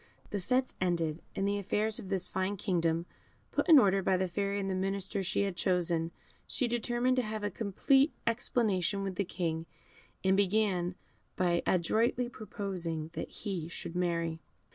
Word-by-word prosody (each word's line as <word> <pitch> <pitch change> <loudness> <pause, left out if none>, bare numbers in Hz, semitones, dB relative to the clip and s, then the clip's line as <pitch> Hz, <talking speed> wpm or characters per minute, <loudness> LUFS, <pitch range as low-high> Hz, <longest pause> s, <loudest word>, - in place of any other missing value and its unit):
The 205 - -1
fêtes 255 +7 +1
ended, 170 -3 0
and 195 - 0
the 205 0 +1
affairs 210 +2 0
of 190 - -8
this 190 -2 0
fine 190 +2 -1
kingdom 170 -3 +1 0.5
put - - 0
in 320 - +10
order 195 -6 +5
by 190 0 +2
the 185 0 0
Fairy 200 +2 -1
and 195 - -2
the 190 - 0
ministers 195 0 -1
she 200 - +2
had 195 -2 -2
chosen, 170 -2 +1 0.4
she 255 - 0
determined 240 +2 +1
to - - +4
have 215 -2 -4
a 205 - -1
complete 265 - +3
explanation 210 -5 +1
with 195 -1 -2
the 200 - 0
King, 165 -2 -2 0.6
and 190 0 +4
began 195 -3 +2 0.4
by 175 -2 +2
adroitly 230 +7 +2
proposing 180 -8 -4
that - - -4
he 185 -7 -4
should 170 0 -5
marry. 170 -2 0
195 Hz, 165 wpm, -32 LUFS, 175-215 Hz, 0.6 s, in